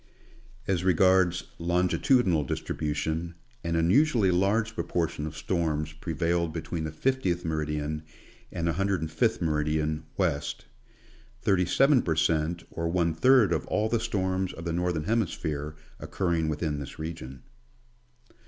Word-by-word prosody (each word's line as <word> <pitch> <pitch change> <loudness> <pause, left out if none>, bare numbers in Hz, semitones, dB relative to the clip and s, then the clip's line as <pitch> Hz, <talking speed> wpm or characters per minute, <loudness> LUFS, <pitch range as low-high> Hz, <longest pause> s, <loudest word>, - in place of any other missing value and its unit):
As 90 -3 0
regards 95 -1 +3 0.2
longitudinal 90 - +2
distribution, 80 +4 -3 0.3
an 85 0 -1
unusually 100 - +3
large 105 +5 +1
pro - - -2
portion 80 -3 -2
of 75 - -8
storms 80 -4 -1
prevailed 85 +1 -1
between 80 0 -4
the 80 - -4
50th 90 - 0
meridian 75 -1 -2 0.5
and 85 - -2
105th 85 -2 0
meridian, 75 0 0
west; 80 -7 -1 0.8
37 120 - +4
per 80 - -1
cent, 80 +1 +1
or 85 0 -2
one 85 -1 +1
third 115 +2 +5
of - - -2
all 110 +1 0
the 115 - +1
storms 95 -5 -1
of 85 - -9
the 85 - -1
Northern 85 -3 -1
Hemisj)here 80 -9 -1 0.2
occurring 85 -4 -1
within 75 -1 -2
this 70 - -8
region. 80 -5 -7
85 Hz, 125 wpm, -28 LUFS, 80-95 Hz, 0.8 s, third